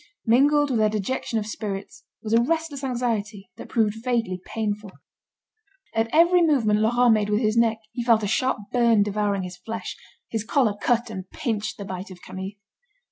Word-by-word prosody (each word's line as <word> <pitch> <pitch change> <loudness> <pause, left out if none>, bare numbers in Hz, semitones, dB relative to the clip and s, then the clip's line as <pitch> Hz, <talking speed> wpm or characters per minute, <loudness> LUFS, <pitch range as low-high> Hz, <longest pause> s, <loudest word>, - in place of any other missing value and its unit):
Mingled 285 +5 +4
with 235 - +1
their 215 0 +4
dejection 215 +3 -2
of 215 - -1
spirits, 205 -2 -6 0.2
was 220 0 -2
a 230 - +6
restless 320 0 -1
anxiety 225 -6 -2
that - - -9
proved 225 -1 0
vaguely 230 -8 -1
painful. 210 -2 -3 1.0
At 225 0 +1
every 345 +3 +5
movement 245 -10 +3
Laurent 240 +2 +4
made 210 -1 +1
with 210 +2 +1
his 215 -1 +1
neck, 230 -1 +3
he 240 - -4
felt 230 -2 +4
a - - 0
sharp 255 +5 +1
burn 235 -4 +4
devouring 205 -1 -1
his 180 0 -7
flesh; 225 +5 -6 0.3
his 225 -2 -3
collar 230 -2 +2
cut 240 0 +1
and 185 0 -7
pinched 225 -9 -3
the 200 - -6
bite 190 +1 -6
of 185 -2 -11
Camille. 190 +2 -6
225 Hz, 180 wpm, -24 LUFS, 205-245 Hz, 1.0 s, a